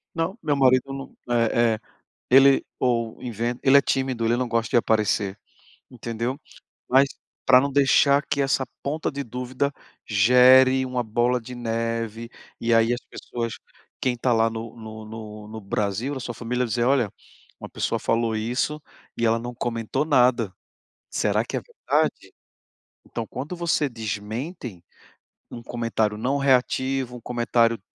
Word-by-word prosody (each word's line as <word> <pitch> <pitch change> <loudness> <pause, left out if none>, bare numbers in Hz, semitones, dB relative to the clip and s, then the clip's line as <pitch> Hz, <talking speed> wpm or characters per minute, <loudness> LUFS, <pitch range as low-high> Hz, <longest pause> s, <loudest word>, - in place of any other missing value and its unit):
"Não, 165 +5 -2
meu 150 -2 +1
marido 130 0 +3
não 135 0 -8 0.2
eh 115 -1 +3
eh, - - -10 0.5
ele 135 +1 +6 0.2
ou 115 -3 0
inven 120 +1 -3
ele 135 +1 +7
é - - +6
tímido, 130 -4 -1
ele 115 +1 +3
não 125 0 -1
gosta 115 -1 0
de - - +3
aparecer", 105 -3 +1 0.5
entendeu? 120 +2 -4 0.5
Mas 135 +2 +5 0.4
pra 130 -1 +7
não 140 +1 -1
deixar 140 +1 +4
que 140 - +1
essa 135 -1 +1 0.2
ponta 150 +3 -2
de 140 0 -4
dúvida 125 +3 -2 0.4
gere 130 +5 +6
uma 125 -1 -2
bola 120 +3 +1
de 125 +2 -9
neve, 115 -1 -3 0.3
e 115 - 0
aí 115 +1 +4
as 120 - -4
pessoas 115 -2 -5 0.5
quem 130 -2 0
tá 125 +1 0
lá 115 0 +3
no 115 0 -7
no 110 -1 -9
no 110 -1 -9
no 110 +1 -8
Brasil, 105 +7 -2
a - - -4
sua 120 -1 -5
família, 125 +2 -1
dizer: 120 +1 -1
"Olha, 125 -6 +2 0.5
uma - - -8
pessoa - - -1
falou 115 -1 0
isso 125 +7 -1 0.4
e 115 - +1
ela 115 0 +3
não 120 +1 -6
comentou 120 +3 -2
nada. 125 -8 +3 0.6
Será - - +1
que - - -3
é - - -3
verdade?". - - -2 0.7
Então, 115 - -5
quando 145 +8 -6
você 170 -3 +1
desmentem 110 - -5 0.7
um 120 - -7
comentário 115 -3 -1
não 130 +6 0
reativo, 130 -1 +1
um - - -13
comentário 115 -1 +1
120 Hz, 155 wpm, -24 LUFS, 115-130 Hz, 0.7 s, ele